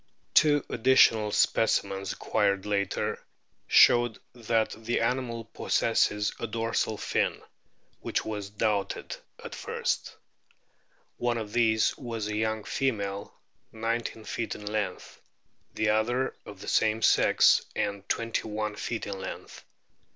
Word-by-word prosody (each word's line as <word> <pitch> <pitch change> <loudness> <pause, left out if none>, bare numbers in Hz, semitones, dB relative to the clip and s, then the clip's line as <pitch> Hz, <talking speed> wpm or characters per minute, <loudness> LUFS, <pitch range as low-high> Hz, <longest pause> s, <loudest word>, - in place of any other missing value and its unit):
Two 145 -2 +4
additional 115 -3 +4
specimens 100 -3 +1
acquired 100 -2 0
later* 100 -2 -1 0.4
showed 120 -2 +5 0.2
that 115 -2 0
the 115 +2 -2
animal 115 -1 -1
possesses 105 -2 +1
a 115 - -3
dorsal 115 -1 -1
fin - - -1 0.6
(which - - -2
was 105 -2 -4
doubted 105 -1 -1 0.3
at - - -7
first). - - -3 1.0
One 120 -1 0
of 110 -2 -6
these 110 -2 +3
was 115 -4 -4
a 105 - -3
young 110 0 -1
female, 100 -7 -2 0.4
nineteen 115 0 -3
feet 115 - -3
in 105 - -10
length; 105 -3 -4 0.5
the 110 - +1
other 120 +5 +1
of - - -10
the - - -9
same 110 0 +2
sex, - - +5
and 100 -1 -3
twenty 115 -1 -1
one 105 0 -3
feet 115 - -3
in 100 -1 -5
lenoth. - - -8
110 Hz, 120 wpm, -28 LUFS, 105-115 Hz, 1.0 s, showed